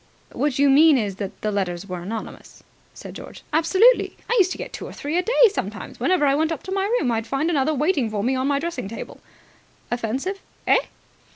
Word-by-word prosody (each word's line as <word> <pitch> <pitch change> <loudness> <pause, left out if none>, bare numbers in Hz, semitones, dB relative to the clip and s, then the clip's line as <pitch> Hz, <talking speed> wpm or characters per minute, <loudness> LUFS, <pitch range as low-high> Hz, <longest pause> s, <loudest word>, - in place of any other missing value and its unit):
"What 290 -3 -1
you 285 +1 +4
mean 295 +2 +6
is 205 -5 -2
that 195 0 -6
the 215 - -1
letters 185 -2 -2
were 180 -2 -5
anonymous," 215 +6 -8 0.3
said - - -9
George. - - -11
"Absolutely. 380 +10 +4
I 480 - +1
used 375 -1 +4
to - - -4
get - - -7
two - - -6
or - - -9
three 295 +3 -4
a 360 - +3
day 475 +4 +5
sometimes. - - -5
Whenever 365 -5 +2
I 275 - +3
went 315 +3 +1
up 320 - -4
to 380 - -7
my 390 0 0
room, 250 - 0
I'd 225 0 -2
find 280 +7 0
another 300 0 +1
waiting 290 -4 +1
for 210 -2 -2
me 255 +4 +1
on 260 +1 0
the 280 -1 +1
dressing 335 - -4
table." 225 - -8 0.7
"Offensive?" 255 - -2 0.3
"Eh?" - - +3
280 Hz, 215 wpm, -23 LUFS, 225-340 Hz, 0.7 s, mean